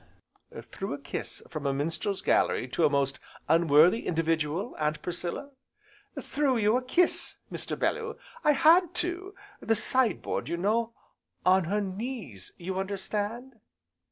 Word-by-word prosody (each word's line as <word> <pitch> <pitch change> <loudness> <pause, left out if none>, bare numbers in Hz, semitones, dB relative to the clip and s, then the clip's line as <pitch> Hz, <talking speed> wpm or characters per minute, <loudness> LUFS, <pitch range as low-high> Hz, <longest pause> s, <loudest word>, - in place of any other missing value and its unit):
"Threw - - -4
a - - -10
kiss - - -6
from 150 -2 -4
a 135 - 0
minstrel's 165 +7 -2
gallery, 125 - +2
to 160 +6 +2
a - - 0
most 140 -1 0 0.3
unworthy 165 +5 +5
individual, 165 +4 -1
Aunt 150 0 0
Priscilla?" 180 +10 -4 0.7
"Threw 280 -4 0
you 215 +1 +3
a 255 - +2
kiss, 335 +8 +1 0.2
Mr. - - -5
Bellew, - - -1 0.3
I 300 - +5
had 340 +5 +5
to, 355 +3 -1 0.2
the 225 - +1
side 230 -1 +2
board - - -3
you 170 - -1
know, 225 +5 0 0.5
on 185 0 +5
her 205 +5 0
knees 195 - -5
you 185 +2 -4
understand?" 210 +5 -3
195 Hz, 140 wpm, -28 LUFS, 165-250 Hz, 0.7 s, unworthy